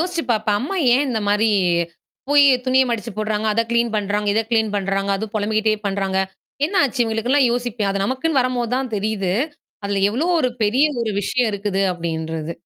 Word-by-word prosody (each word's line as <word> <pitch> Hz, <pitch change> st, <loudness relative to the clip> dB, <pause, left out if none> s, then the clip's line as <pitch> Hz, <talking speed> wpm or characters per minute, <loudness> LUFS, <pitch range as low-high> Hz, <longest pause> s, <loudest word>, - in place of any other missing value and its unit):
யோசிச்சு 345 Hz, -1 st, -1 dB
பாப்பேன். 215 Hz, -1 st, +1 dB
அம்மா 340 Hz, +9 st, -3 dB, 0.2 s
ஏன் 280 Hz, +3 st, +2 dB
இந்த 225 Hz, -3 st, -1 dB
மாரி 210 Hz, +2 st, +3 dB, 0.8 s
போயி, 290 Hz, 0 st, +6 dB, 0.2 s
துணிய 260 Hz, +1 st, +4 dB
மடிச்சு 230 Hz, 0 st, -3 dB
போடுறாங்க, 215 Hz, 0 st, -1 dB
அத 230 Hz, -, +1 dB
கிளீன் 235 Hz, -1 st, +1 dB
பண்றாங்க, 205 Hz, 0 st, -1 dB
இத 225 Hz, -, +3 dB
கிளீன் 220 Hz, -2 st, +1 dB
பண்றாங்க. 195 Hz, 0 st, -1 dB
அதும் 215 Hz, +1 st, -6 dB
பொலம்பிக்கிட்டே 215 Hz, +1 st, +1 dB
பண்றாங்க! 195 Hz, -1 st, -1 dB, 0.5 s
என்னா 375 Hz, +1 st, +1 dB
ஆச்சு? 260 Hz, -1 st, -2 dB
இவுங்களுக்குன்ல்லாம் 240 Hz, +4 st, +2 dB
யோசிப்பேன். 240 Hz, -4 st, -2 dB
அது 195 Hz, 0 st, -1 dB
நமக்குன்னு 265 Hz, +4 st, 0 dB
வரம்போது 250 Hz, -2 st, -1 dB
தான் 260 Hz, -3 st, -3 dB
தெரியுது. 200 Hz, -3 st, -1 dB, 0.5 s
அதுல 200 Hz, -1 st, -1 dB
எவ்ளோ 280 Hz, +10 st, -1 dB
ஒரு 255 Hz, -, +2 dB
பெரிய 245 Hz, +8 st, +3 dB, 0.2 s
ஒரு 220 Hz, -, -1 dB
விஷயம் 245 Hz, +2 st, 0 dB
இருக்குது 200 Hz, -1 st, -2 dB
அப்டின்றது. 160 Hz, -1 st, -4 dB
220 Hz, 170 wpm, -20 LUFS, 200-250 Hz, 0.8 s, போயி